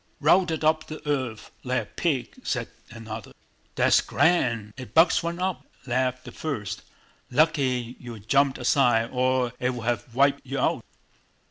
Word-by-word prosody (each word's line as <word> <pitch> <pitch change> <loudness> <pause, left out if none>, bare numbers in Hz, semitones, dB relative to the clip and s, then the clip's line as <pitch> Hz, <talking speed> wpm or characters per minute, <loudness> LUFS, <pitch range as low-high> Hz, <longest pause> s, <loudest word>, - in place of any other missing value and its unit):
"Routed 165 0 +3
up 155 0 +2
the 155 0 -9
earth 130 -7 -2
like 125 0 0
a - - -13
pig," 140 -8 -2
said 125 - -2 0.2
another. 110 -1 -8 0.4
"That's - - +4
grand, 115 -11 +1
it 125 -4 -10
bucks 165 +1 +5
one 170 +1 -3
up!" 185 0 -2 0.2
laughed 130 0 -1
the - - -8
first. 110 -11 -4 0.5
"Lucky 130 -4 +1
you 120 -2 -8
jumped 135 +6 +2
aside, 120 -4 +2
or 130 -1 +1
it 125 0 0
would 115 -2 -6
have 120 0 -2
wiped 140 +1 +3
you 135 +1 -5
out!" - - 0
130 Hz, 150 wpm, -25 LUFS, 120-150 Hz, 0.5 s, bucks